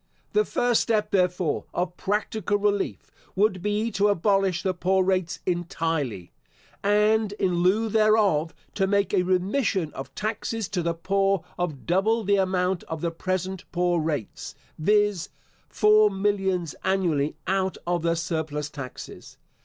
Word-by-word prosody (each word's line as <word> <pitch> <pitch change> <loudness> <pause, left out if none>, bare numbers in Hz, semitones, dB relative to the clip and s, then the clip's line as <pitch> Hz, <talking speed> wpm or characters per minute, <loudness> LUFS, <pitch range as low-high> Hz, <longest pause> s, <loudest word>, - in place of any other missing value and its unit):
The 425 0 +3
first 245 -2 +2
step, 215 -2 0
therefore, 180 -4 +1
of 180 0 -1
practical 205 0 -1
relief, 205 -1 -1 0.2
would 190 -1 +2
be 210 +3 -1
to 200 0 +2
abolish 195 -2 +1
the 190 - +1
poor 190 +2 +1
rates 185 -2 0
entirely, 160 - -2 0.5
and 210 +1 +3
in 185 -4 0
lieu 205 +5 +3
thereof, 215 -7 +3 0.2
to 195 -2 +1
make 200 -1 +1
a - - +4
remission 185 - 0
of 135 0 -8
taxes 220 0 -3
to 190 -3 -1
the 170 0 -1
poor 195 +1 +1
of 160 -7 -4
double 215 +6 +2
the 200 0 +2
amount 185 -1 +1
of 160 -1 -5
the 170 - -1
present 185 +2 -3
poor 175 -1 +1
rates, 150 -8 -4 0.2
viz., 205 +1 +2 0.4
four 210 0 +5
millions 190 -5 -1
annually 170 -7 +1
out 190 0 0
of 175 -1 0
the 170 0 +1
surplus 155 -3 -3
taxes. 135 -3 -9
190 Hz, 140 wpm, -25 LUFS, 170-205 Hz, 0.5 s, four